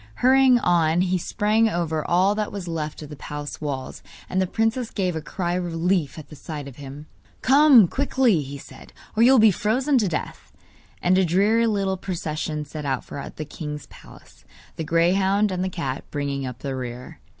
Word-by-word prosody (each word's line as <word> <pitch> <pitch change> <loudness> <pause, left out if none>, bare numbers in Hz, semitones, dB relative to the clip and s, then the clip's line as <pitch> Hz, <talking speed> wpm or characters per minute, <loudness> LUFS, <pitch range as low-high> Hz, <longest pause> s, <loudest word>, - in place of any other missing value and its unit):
Hurrying 260 0 +5
on 175 -5 +2
he 185 0 +1
sprang 215 +4 +1
over 165 -4 -1
all 185 +6 +3
that 210 0 -2
was 195 -3 -6
left 155 -2 -4
of 150 - -10
the - - -7
palace 145 +1 -7
walls, 135 -3 -5 0.3
and 185 - 0
the 185 - 0
princess 225 +4 -1
gave 185 -4 -2
a 160 - -3
cry 175 +3 -3
of 180 0 -1
relief 170 -2 -1
at 150 -3 -10
the 150 - -11
sight 150 -1 -7
of 135 - -11
him. 140 +1 -9 0.4
'Come 270 -6 +7
quickly,' 260 - +1
he 140 0 -7
said, - - -14 0.2
'or 220 - +2
you 245 +3 +7
will 265 - +6
be 220 -2 +6
frozen 255 - +1
to 210 - +1
death!' 165 -3 -5 0.5
And 185 +1 +4
a - - +4
dreary 205 +7 +3
little 195 -3 0
procession 155 -4 -4
set 150 +1 -7
out 135 -2 -2
for 140 - -7
the 155 - -5
king's 150 -1 -7
palace, - - -16 0.3
the 160 - -4
greyhound 190 +5 +2
and 185 0 -2
the 190 - -1
cat 140 -7 -4
bringing 140 -2 -3
up 125 -1 -9
the 135 -2 -3
rear. 125 -1 -7
175 Hz, 195 wpm, -23 LUFS, 150-210 Hz, 0.5 s, Come